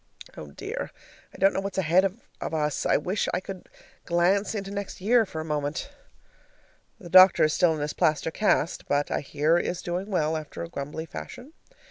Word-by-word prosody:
Oh 75 - -8
dear, 70 - -6 0.4
I - - -14
don't 195 +1 +4
know - - -1
what's 195 0 -5
ahead 180 +1 +3
of 195 +4 -3 0.4
us! 150 -1 -1
I - - +4
wish 185 +6 -1
I - - 0
could 185 0 -9 0.3
glance 185 +5 +1
into 195 -1 -4
next 200 -1 -5
year 225 +3 +3
for 160 - -6
a 155 - -4
moment. 150 - -3 1.1
The 180 - -11
doctor 185 0 +8
is 155 -1 +3
still 170 -3 +3
in 150 - -5
his 150 0 -2
plaster 155 +1 +1
cast, 175 -4 0
but 145 0 0
I - - +1
hear 150 +4 +1
is 175 +1 -3
doing 180 +4 -3
well, 160 -5 0
after 155 0 -6
a 170 - -7
grumbly 150 +1 -5
fashion. 250 - -9
175 Hz, 190 wpm, -26 LUFS, 155-195 Hz, 1.1 s, doctor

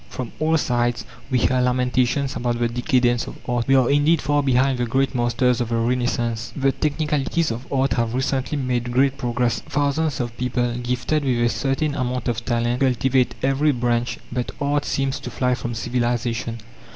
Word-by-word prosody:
From 125 -3 -6
all 160 +1 +2
sides 120 -4 0 0.2
we 130 - +2
hear 125 +2 +2
lamentations 125 +2 +1
about 120 0 -1
the 120 0 +1
decadence 120 0 +1
of - - -8
art. 120 -1 -1
We 135 - +5
are, 130 -2 +4
indeed, 145 +4 +3
far 145 +1 +1
behind 130 -1 +2
the 120 - 0
great 135 +4 +1
masters 120 0 +1
of 120 - -2
the 115 - 0
Renaissance. 120 -1 -1
The 135 -1 +2
technicalities 150 +1 0
of 120 +4 -7
art 135 -3 +1
have 115 0 -1
recently 130 +2 -1
made 125 -3 -1
great 135 +2 +2
progress; 120 -1 0
thousands 145 0 -1
of 120 -2 -3
people 120 -1 0
gifted 125 +5 -1
with 130 -3 +1
a 120 0 +3
certain 140 +4 -1
amount 125 -2 -2
of 115 -1 -2
talent 120 +1 0
cultivate 130 -1 +2
every 135 +3 +3
branch, 120 -1 0
but 125 -2 -2
art 145 0 0
seems 135 -1 -1
to - - -7
fly 125 -1 0
from 120 -1 -4
civilization! 120 -1 -1
125 Hz, 180 wpm, -22 LUFS, 120-135 Hz, 0.2 s, We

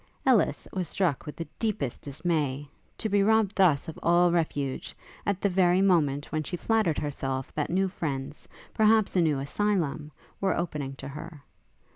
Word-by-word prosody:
Ellis 255 -6 +3
was 180 -4 -2
struck 170 -9 0
with 150 - -6
the 165 - -6
deepest 215 - -2
dismay, 145 -2 -2 0.3
to 220 - -2
be 205 -1 +2
robbed 215 -1 +3
thus 175 -8 +3
of 160 - -7
all 175 +1 +4
refuge, 145 -5 -2 0.3
at 200 -2 0
the - - +3
very 180 -1 +3
moment 150 -7 +2
when 155 - 0
she 165 +4 -4
flattered 215 -7 +1
herself 135 -3 -3
that 150 - -2
new 190 +2 +2
friends, 145 -5 -5 0.3
perhaps 220 -1 +3
a 180 - +4
new 155 -4 +2
asylum, 155 -1 -1 0.3
were 195 - +1
opening 150 -5 -3
to - - -8
her. 150 +1 -9
170 Hz, 165 wpm, -27 LUFS, 145-195 Hz, 0.3 s, all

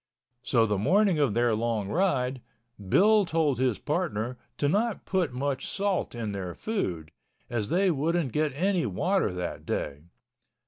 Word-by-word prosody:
So 115 -2 +3
the 105 -3 0
morning 185 - +3
of 135 -8 +2
their 120 -1 +3
long 110 -2 -1
ride, 130 - 0 0.5
Bill 210 - +5
told 155 -7 +1
his 130 -4 +1
partner 125 - -2 0.2
to 145 - +1
not 210 +7 0
put 180 -7 0
much 135 +2 -2
salt 195 -9 -1
in 115 -3 -3
their 95 -3 -5
food, 90 - -3 0.4
as 110 -3 -1
they 190 +1 +3
wouldn't 160 -1 0
get 150 +2 +1
any 180 -2 +1
water 170 - +1
that 90 -1 -5
day. 75 +2 -4
140 Hz, 150 wpm, -27 LUFS, 110-180 Hz, 0.5 s, Bill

